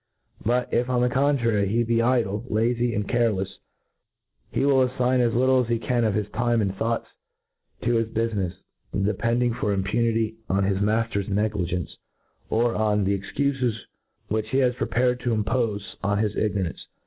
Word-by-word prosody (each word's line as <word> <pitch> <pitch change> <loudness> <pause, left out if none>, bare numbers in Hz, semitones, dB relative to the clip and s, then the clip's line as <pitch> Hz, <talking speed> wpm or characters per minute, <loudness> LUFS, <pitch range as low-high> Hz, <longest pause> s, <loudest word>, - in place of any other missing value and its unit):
But 125 +2 0
if, 120 +1 +1
on 125 -1 +2
the 125 - +3
contrary, 120 -7 +2
he 115 +4 +1
be 115 0 +1
idle, 115 -4 +1
lazy, 120 +2 +1
and 105 -1 -1
carelefs, 105 -5 0 0.9
he - - +1
will 135 -2 +4
affign 125 0 +1
as 120 -2 +2
litde 130 +1 +4
as - - -11
he 120 - +2
can 120 +1 0
of 110 -2 +2
• - - -2
his 105 -1 -1
time 120 0 +1
and 100 -3 0
thoughts 115 +3 -1 0.8
to 120 0 +2
his 115 -1 0
bufinefs, 110 -5 -1 0.4
depending 115 +4 +1
for 115 -3 -1
impunity 110 +3 0
on 95 +1 +2
his 95 0 +1
mafter^s 105 -1 0
negligence, 95 -4 -1 0.5
or 115 +1 +2
oq 105 -2 +1
the 100 0 +1
cxcufes 130 +2 -1 0.5
which 110 0 -2
he 130 - 0
has 125 -2 +3
prepared 125 0 0
to 120 -2 0
impofe 105 -1 0 0.2
on 100 +1 +1
his 105 0 0
ignorance. 100 -5 -1
115 Hz, 170 wpm, -25 LUFS, 105-120 Hz, 0.9 s, will